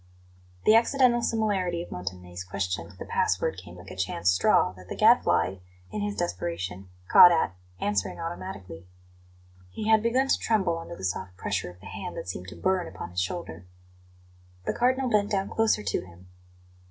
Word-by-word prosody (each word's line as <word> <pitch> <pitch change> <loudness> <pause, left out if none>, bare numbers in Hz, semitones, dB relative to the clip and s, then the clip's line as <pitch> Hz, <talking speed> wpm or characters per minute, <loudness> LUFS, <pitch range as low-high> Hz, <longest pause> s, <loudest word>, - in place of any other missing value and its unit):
The 215 - +7
accidental 240 +1 +4
similarity 195 -7 0
of - - -13
Montanelli's 90 0 -6
question 90 -2 -3
to 95 - -16
the - - -7
password 95 +1 0
came 90 -1 -11
like 90 +2 -11
a - - -8
chance 90 -1 +1
straw, 90 - +3
that 90 0 -15
the - - -4
Gadfly, 95 - +4 0.3
in 105 - -3
his 100 0 -2
desperation, 90 +1 -4 0.2
caught 175 - +9
at, 165 - +1 0.3
answering 100 0 -1
automatically. 100 - -7 0.8
He 215 - -4
had 220 -1 +6
begun 250 +4 +2
to - - +2
tremble 190 -7 +1
under 165 - -8
the 95 - -11
soft 95 0 -3
pressure 95 -2 -2
of 90 0 -14
the - - -14
hand - - -6
that - - -6
seemed 90 0 -6
to - - -9
burn 185 -2 0
upon 85 - -8
his 90 +1 -1
shoulder. 90 - -5 1.0
The - - 0
Cardinal 255 +2 +1
bent 210 -3 +2
down 195 -1 -1
closer 225 - +2
to 100 -4 -1
him. 90 +1 -16
100 Hz, 175 wpm, -27 LUFS, -, 1.0 s, caught